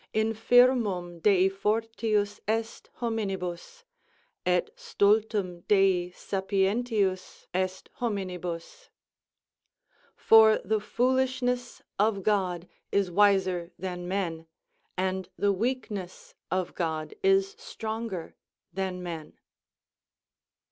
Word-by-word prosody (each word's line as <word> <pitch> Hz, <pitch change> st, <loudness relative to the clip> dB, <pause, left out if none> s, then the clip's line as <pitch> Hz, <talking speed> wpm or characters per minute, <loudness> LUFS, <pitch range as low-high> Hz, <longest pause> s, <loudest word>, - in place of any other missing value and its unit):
Infirmum 220 Hz, -5 st, +3 dB
dei 190 Hz, +1 st, +4 dB
fortius 210 Hz, +1 st, -1 dB
est 225 Hz, +1 st, -2 dB
hominibs; 205 Hz, -, -3 dB, 0.6 s
et 180 Hz, -, +2 dB
stultum 210 Hz, -, +1 dB
dei 190 Hz, -3 st, +3 dB
sapientius 195 Hz, +1 st, -1 dB
est 185 Hz, 0 st, -2 dB
hominibus. 185 Hz, -, -4 dB, 1.3 s
"For 220 Hz, -1 st, +6 dB
the 220 Hz, 0 st, +1 dB
foolishness 250 Hz, +2 st, 0 dB, 0.2 s
of 205 Hz, -2 st, +2 dB
God 185 Hz, -4 st, 0 dB, 0.2 s
is 195 Hz, -3 st, +1 dB
wiser 190 Hz, -3 st, +3 dB
than 180 Hz, -1 st, -5 dB
men, 170 Hz, -4 st, -3 dB, 0.5 s
and 185 Hz, 0 st, -1 dB
the 200 Hz, 0 st, +2 dB
weakness 210 Hz, -4 st, -4 dB, 0.2 s
of 185 Hz, -1 st, -1 dB
God 160 Hz, -3 st, -3 dB
is 390 Hz, 0 st, +3 dB
stronger 220 Hz, -, -5 dB, 0.4 s
than 185 Hz, -1 st, -3 dB
men." 165 Hz, -3 st, -7 dB
200 Hz, 85 wpm, -28 LUFS, 180-225 Hz, 1.3 s, For